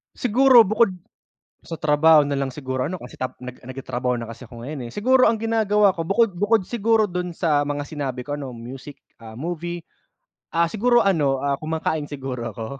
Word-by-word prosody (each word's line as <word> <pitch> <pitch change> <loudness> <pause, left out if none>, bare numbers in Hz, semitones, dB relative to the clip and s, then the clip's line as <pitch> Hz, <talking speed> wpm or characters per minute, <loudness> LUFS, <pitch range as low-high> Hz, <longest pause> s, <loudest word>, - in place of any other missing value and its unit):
Siguro 250 0 +6
bukod 215 -1 +3 0.7
sa 165 - -8
trabaho 155 +1 +5
nalang 140 -2 -2
siguro 130 -3 -3
ano, 180 +2 -5
kasi 125 - -11
tap 130 0 -4
nag 125 0 -8
nagtatrabaho 130 -1 -3
na 115 - -7
kasi 120 +2 -10
ako 115 0 -12
ngayon 130 -2 -6
eh. - - -10
Siguro 255 +5 +4
ang 225 -1 +2
ginagawa 210 -3 +3
ko 165 - -2
bukod 200 -1 +1
bukod 205 +2 +2
siguro 220 0 +1
dun 180 -1 -4
sa 150 -4 +1
mga 145 0 -2
sinabi 140 -4 -5
ko, 145 +3 -5
ano, 135 -3 -7
music, 130 +4 -10 0.2
ah, 110 -1 -12
movie, 170 +5 -5 0.7
ah, 170 0 +2
siguro 240 +6 +2
ano, 145 -9 +2
ah, 140 0 0
kumakain 160 0 -2
siguro 130 -5 -5
ako, 110 +2 -7
150 Hz, 185 wpm, -22 LUFS, 130-200 Hz, 0.7 s, Siguro